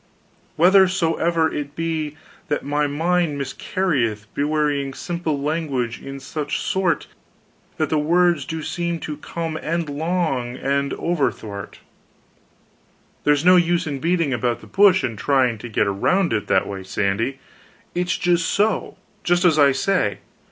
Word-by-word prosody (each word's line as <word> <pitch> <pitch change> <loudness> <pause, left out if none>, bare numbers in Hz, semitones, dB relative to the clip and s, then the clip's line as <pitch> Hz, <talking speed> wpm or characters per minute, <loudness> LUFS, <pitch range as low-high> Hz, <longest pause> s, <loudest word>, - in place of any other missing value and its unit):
"Whethersoever 170 -2 +3
it 145 -1 -5
be 160 -2 -3 0.3
that 145 - -2
my 145 +1 +1
mind 165 +1 0
miscarrieth, 135 - -1
bewraying 145 -2 0
simple 170 -4 -3
language 140 -6 -2
in 135 0 -7
such 145 +2 -3
sort 190 -3 0 0.7
that 155 - -1
the 155 - +2
words 170 0 +3
do 160 -1 -5
seem 170 0 -2
to 150 -1 -5
come 165 +1 -4
endlong 155 -5 -1
and 140 +1 0
overthwart 110 - -3 0.7
" - - -37
"There's 150 +1 +3
no 180 0 +8
use 175 +1 +2
in 145 -4 -3
beating 165 -2 +1
about 120 0 -1
the - - -12
bush 195 -1 +4
and 115 -5 -3
trying 130 -5 +2
to 120 - -8
get 105 - +1
around 165 - +1
it 105 -2 -1
that - - +3
way, 100 -1 -6
Sandy, 100 +7 -1 0.6
it's 180 +1 -1 0.2
so, 205 +5 0 0.3
just 175 +1 +2
as 160 -3 +4
I 140 -1 +6
say. 135 - 0
150 Hz, 135 wpm, -22 LUFS, 135-175 Hz, 0.7 s, no